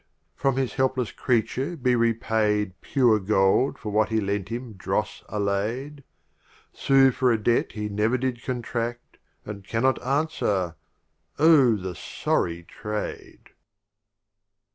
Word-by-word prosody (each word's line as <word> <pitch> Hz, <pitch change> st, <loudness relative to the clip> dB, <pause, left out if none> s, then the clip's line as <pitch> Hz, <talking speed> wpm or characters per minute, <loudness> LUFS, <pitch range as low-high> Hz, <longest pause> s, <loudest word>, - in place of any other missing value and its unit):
from 135 Hz, -, 0 dB
his 130 Hz, -5 st, -1 dB
helpless 130 Hz, -3 st, 0 dB
Creature 125 Hz, +7 st, -1 dB
be 125 Hz, -3 st, +2 dB
repaid 110 Hz, -3 st, +1 dB
Pure 120 Hz, -6 st, +3 dB
Gold 95 Hz, +5 st, +2 dB
for 105 Hz, -, -6 dB
what 110 Hz, +1 st, +2 dB
he 110 Hz, -1 st, +1 dB
lent 100 Hz, -1 st, -2 dB
him 120 Hz, 0 st, -5 dB
dross 95 Hz, -, -3 dB
allay'd 110 Hz, +8 st, -2 dB, 0.4 s
— -, -, -39 dB, 0.3 s
Sue 135 Hz, -1 st, +4 dB
for 125 Hz, 0 st, +2 dB
a 115 Hz, -, +3 dB
Debt 115 Hz, +2 st, +1 dB
he 105 Hz, -1 st, -3 dB
never 105 Hz, +4 st, +1 dB
did 125 Hz, -1 st, -3 dB
con 125 Hz, -2 st, -3 dB
tradt, 120 Hz, +1 st, -2 dB, 0.5 s
And 100 Hz, -2 st, -7 dB
cannot 120 Hz, +5 st, 0 dB
answer 125 Hz, -, 0 dB, 0.3 s
— -, -, -49 dB, 0.3 s
Oh 145 Hz, -7 st, +6 dB
the 95 Hz, -3 st, -5 dB
sorry 85 Hz, +2 st, -2 dB
trade 105 Hz, +4 st, -7 dB
115 Hz, 135 wpm, -25 LUFS, 105-130 Hz, 0.5 s, Oh